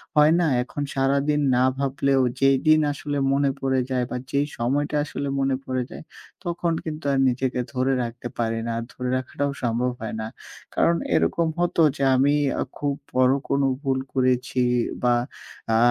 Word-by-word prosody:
হয় 150 +1 +6
না? 175 - +2 0.2
এখন 140 +3 -5
সারাদিন 140 +2 +2
না 125 - +3 0.2
ভাবলেও 135 0 +1 0.2
যেদিন 135 +3 +4
আসলে 145 0 -4 0.2
মনে 140 0 +2
পড়ে 130 -1 +1
যায় 125 -1 +1
বা 125 - -2
যেই 140 +1 +2
সময়টা 140 +5 0
আসলে 140 -1 -4
মনে 135 -1 +1
পড়ে 130 -1 -1
যায়, - - -9 0.4
তখন 170 -1 -1
কিন্তু 155 -1 -5
আর 135 - +2
নিজেকে 125 0 -1
ধরে 130 +1 +1
রাখতে 120 +1 -6
পারি 115 -1 0
না। - - -1
আর - - -4
ধরে 125 0 -4
রাখাটাও 140 +2 -2
সম্ভব 120 +1 +1
হয় 110 -1 -4
না। 110 - -4 0.5
কারণ 170 0 +3 0.2
এরকম 85 - +2
হতো 175 -1 +1 0.2
যে 140 - -1
আমি 140 +3 +3 0.3
আ - - +2 0.2
খুব 145 -1 0 0.2
বড় 130 0 +5 0.2
কোনো 140 0 +2 0.2
ভুল 135 -2 0
করেছি 130 -1 +1 0.4
বা 120 0 +4 0.6
আ - - +5
135 Hz, 170 wpm, -24 LUFS, 125-145 Hz, 0.6 s, হয়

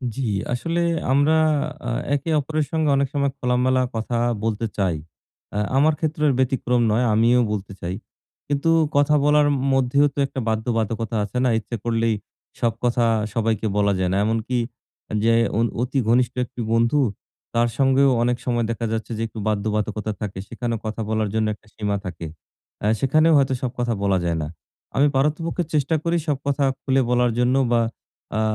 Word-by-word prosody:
জি, 135 - -3 0.3
আসলে 165 +7 -1 0.3
আমরা 145 +3 +4 0.6
আ - - -1 0.3
একে 145 +4 -3
অপরের 155 +1 -1
সঙ্গে 160 -2 +1
অনেক 140 0 +2
সময় 140 -1 +1
খোলামেলা 125 +1 +2
কথা 115 +2 -2 0.3
বলতে 115 0 -1
চাই। 95 -5 +1 0.6
অ্যা 105 - 0 0.2
আমার 155 +3 +4
ক্ষেত্রে 155 -1 -2
এর - - +2
ব্যতিক্রম 125 -2 +1
নয়, 120 +4 +2
আমিও 120 +3 +4
বলতে 100 -2 -4
চাই। 90 +2 -3 0.5
কিন্তু 145 +3 0 0.3
কথা 145 +1 +4
বলার 150 0 +4 0.3
মধ্যেও 135 +2 +3
তো - - -28
একটা 130 - -5
বাধ্যবাধকতা 115 0 -1
আছে 105 +4 -5
না? - - +3
ইচ্ছে 120 - -6
করলেই 115 -1 +1 0.5
সব 115 -2 +2
কথা 120 0 +2 0.3
সবাইকে 110 -2 0
বলা 100 -1 +3
যায় 90 -1 +1
না। - - +1
এমনকি 115 +3 -1 0.7
যে 115 0 +4 0.2
অন 115 - +3 0.2
অতি 135 +2 0
ঘনিষ্ঠ 125 +1 +3
একটি 120 - -8
বন্ধু 115 +5 +3 0.5
তার 120 0 +3
সঙ্গেও 135 0 +4
অনেক 125 0 +1
সময় 120 -2 0
দেখা 115 0 -3
যাচ্ছে 110 +1 -4
যে - - -3
একটু 110 - -9
বাধ্যবাধকতা 105 0 -1
থাকে। 100 -2 -4
সেখানেও 115 -3 -3
কথা 110 +1 -3
বলার 110 -2 0
জন্য 110 -1 +1
একটা 105 - -28
সীমা 105 -1 -1
থাকে। 85 -2 -6 0.6
অ্যা 105 - +1
সেখানেও 155 +4 +4
হয়তো 135 -1 +2
সব 125 -2 -2
কথা 120 -1 0
বলা 100 -2 +2
যায় 85 -1 0
না। 75 - -3 0.5
আমি 145 +2 +4
পারতপক্ষে 155 +5 0
চেষ্টা 150 +2 +2
করি 170 0 +1
সব 145 -3 +1
কথা 140 0 +1 0.2
খুলে 135 0 +2
বলার 125 -1 +3
জন্য 125 +2 +2 0.2
বা 115 - +4 0.6
আ - - +2
120 Hz, 170 wpm, -22 LUFS, 110-140 Hz, 0.7 s, আমরা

